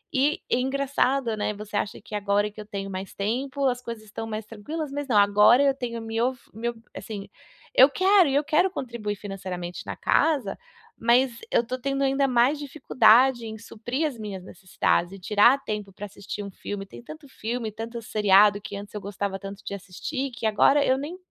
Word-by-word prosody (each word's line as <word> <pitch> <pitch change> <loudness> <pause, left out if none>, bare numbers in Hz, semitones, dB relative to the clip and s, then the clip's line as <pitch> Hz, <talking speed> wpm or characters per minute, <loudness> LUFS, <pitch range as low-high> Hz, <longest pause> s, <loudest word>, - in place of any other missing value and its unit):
E 280 +3 +2
e - - +2
engraçado, 270 -2 0
né, 210 - -1
você 210 0 -8
acha 205 - -2
que 215 - -14
agora 205 0 +1
que 215 +1 -10
eu - - -10
tenho 195 -1 -5
mais 190 +1 -6
tempo, 260 +7 -2
as 250 -1 -1
coisas 230 -3 -7
estão 215 +1 -7
mais 215 -1 -5
tranquilas, 275 +8 -6
mas 285 0 -4
não. 225 -6 +2
Agora 210 +6 +6
eu 275 -1 +4
tenho 235 -3 -4
mio 225 +3 0
fi 245 - -26
meu 235 +3 -3 0.2
assim, 205 -3 -6 0.5
e - - +6
eu 265 - +9
quero 370 +1 +4
e 270 - 0
eu 290 - +3
quero 315 +5 +3
contribuir 235 - -4
financeiramente 185 -3 -6
na - - -4
casa, 310 -5 +1 0.4
mas 240 +2 +3 0.2
eu 235 - +3
tô 255 +2 -4
tendo 275 +1 -1
ainda 275 0 +2
mais 255 +3 +3
dificuldade 255 -4 +4
em 220 0 -7
suprir 240 +7 -4
as 285 - -6
minhas 200 -4 -6
necessidades 185 -1 -1
e 195 - -9
tirar 210 +7 +5
tempo 210 -2 -4
pra 205 - -7
assistir 205 +1 -7
um 200 - -7
filme, 195 +1 -6
tem 195 - -12
tanto 310 +2 -11
filme, 230 -2 -4
tanto 230 +2 -6
seriado 205 -1 +4
que 205 -1 -7
antes 200 +1 -9
eu 210 - -4
gostava 200 0 -4
tanto 195 +1 -9
de - - -4
assistir, 260 - -5
que 230 - -6
agora 275 +7 +4
eu 260 - +3
nem 300 +7 -6
225 Hz, 205 wpm, -25 LUFS, 205-270 Hz, 0.5 s, eu